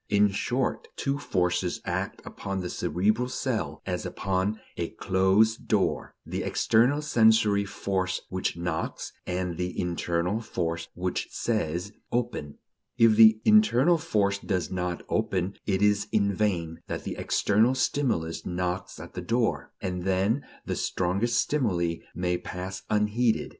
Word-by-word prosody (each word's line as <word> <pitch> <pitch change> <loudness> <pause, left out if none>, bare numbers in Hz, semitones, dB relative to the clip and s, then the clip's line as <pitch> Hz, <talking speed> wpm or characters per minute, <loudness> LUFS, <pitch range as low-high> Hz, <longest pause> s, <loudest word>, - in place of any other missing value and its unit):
In 105 0 +4
short, 125 +6 -1
two 140 +1 -1
forces 90 -5 0
act - - -3
upon 100 -1 -4
the 90 - -4
cerebral 110 +9 0
cell, 110 - -2
as - - -2
upon 95 +2 -1 0.2
a 85 -1 -2
closed 95 +4 +2
door: - - 0
the - - -3
external 125 +7 +2
sensory 110 -7 +4
force 95 -2 -2
which 95 -2 -2
knocks, 85 -2 -3
and 90 -1 -2
the 90 0 -3
internal 90 +3 -1
force 85 -6 -3
which 90 +1 -2
says: 95 -4 -2 0.2
Open. 120 -12 -2 0.4
If 115 -2 +6
the 110 0 +7
internal 175 - +5
force 100 -6 +1
does 95 -3 -2
not 90 -2 -2
open, 95 +1 -1
it 95 -1 +1
is 105 0 +3
in 100 -1 +2
vain 85 -5 -1
that - - -4
the - - -4
external 110 +6 +2
stimulus 120 - 0
knocks 90 +1 -3
at - - -10
the - - -4
door. 115 0 0
And 90 -1 -3
then 95 +8 +1 0.2
the - - -2
strongest 100 +7 0
stimuli 90 - +1 0.2
may 90 0 0
pass 95 +1 -6
unheeded. 110 +2 +1
100 Hz, 135 wpm, -27 LUFS, 90-110 Hz, 0.4 s, the